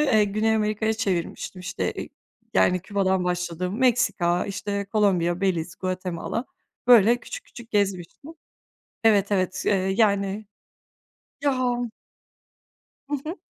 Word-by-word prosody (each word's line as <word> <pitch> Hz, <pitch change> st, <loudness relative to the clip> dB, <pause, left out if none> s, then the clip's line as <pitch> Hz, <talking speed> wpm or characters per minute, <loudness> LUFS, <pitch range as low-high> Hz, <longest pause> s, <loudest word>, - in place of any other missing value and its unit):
eee, 220 Hz, -8 st, +4 dB
Güney 215 Hz, +2 st, +1 dB
Amerika'ya 215 Hz, 0 st, +1 dB
çevirmiştim, 190 Hz, -3 st, -3 dB
işte 180 Hz, -, -2 dB
e -, -, -5 dB, 0.5 s
yani, 180 Hz, -, +4 dB
Küba'dan 190 Hz, -1 st, 0 dB
başladım, 180 Hz, +2 st, -2 dB
Meksika, 235 Hz, -9 st, +2 dB
işte, 200 Hz, 0 st, -3 dB
Kolombiya, 190 Hz, -4 st, +1 dB
Beliz, 175 Hz, -4 st, 0 dB
Guatemala, 185 Hz, +4 st, -3 dB, 0.4 s
böyle, 235 Hz, -1 st, +7 dB
küçük -, -, -8 dB
küçük 240 Hz, -2 st, -13 dB
gezmiştim. 200 Hz, -, -1 dB, 0.7 s
Evet, 205 Hz, -2 st, +4 dB
evet, 185 Hz, -1 st, 0 dB
eee, -, -, +3 dB, 0.2 s
yani. 200 Hz, -1 st, +2 dB, 1.0 s
Ya. 255 Hz, -3 st, +2 dB, 1.3 s
Hı 290 Hz, -, -1 dB
hı. 335 Hz, +4 st, -4 dB
200 Hz, 110 wpm, -25 LUFS, 185-220 Hz, 1.3 s, böyle